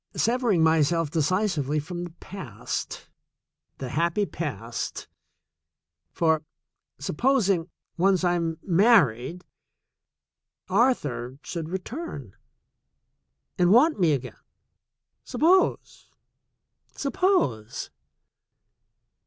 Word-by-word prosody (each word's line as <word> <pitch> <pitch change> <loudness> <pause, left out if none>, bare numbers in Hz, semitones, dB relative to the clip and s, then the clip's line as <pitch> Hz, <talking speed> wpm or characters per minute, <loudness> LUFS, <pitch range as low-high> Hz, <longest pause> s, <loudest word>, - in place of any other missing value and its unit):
"Severing 230 -7 +2
my 160 0 +4
self 165 0 +1
decisively 160 -3 0
from 175 +3 -5
the 175 - -6
past 190 +2 -6 0.3
— - - -56
the 130 - -5
happy 170 +8 +1
past 120 - -5 0.5
— 80 0 -59
for 160 -2 +1 0.5
supposing, 195 - +1 0.3
once 190 +1 +3
I 175 -1 +3
am 165 -2 -1
married, 175 - +3 1.2
Arthur 165 - +1
should 165 -2 -5
return 185 - -6 1.2
and 175 0 +4
want 270 +5 +5
me 165 -4 +4
again 130 -2 -5 0.5
— - - -63 0.3
suppose! 365 +4 +1 0.9
Suppose 275 - 0
170 Hz, 85 wpm, -26 LUFS, 145-200 Hz, 1.2 s, want